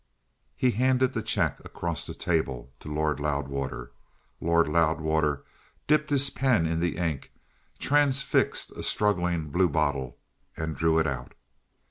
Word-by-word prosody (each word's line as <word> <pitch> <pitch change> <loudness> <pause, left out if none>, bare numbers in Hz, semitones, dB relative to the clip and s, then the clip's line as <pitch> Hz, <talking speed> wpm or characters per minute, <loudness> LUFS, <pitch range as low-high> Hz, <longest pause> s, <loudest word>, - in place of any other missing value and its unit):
He 125 - +2
handed 130 +2 +2
the 115 - -1
cheque - - 0
across 85 -4 -4
the - - -7
table 70 -6 -2
to 75 - -8
Lord 75 0 0
Loudwater. 70 -3 -3 0.5
Lord 85 -1 +3
Loudwater 80 -2 +1 0.4
dipped 150 0 +2
his 140 -1 +4
pen 130 -11 +2
in 80 0 0
the 85 0 -1
ink, 80 -6 -2 0.5
transfixed 140 -2 +2
a - - -8
struggling 90 -7 +1
bluebottle, 70 -8 +1 0.4
and 80 -1 -3
drew 80 0 +2
it 80 - +3
out. 65 -4 -4
80 Hz, 130 wpm, -27 LUFS, 75-105 Hz, 0.5 s, his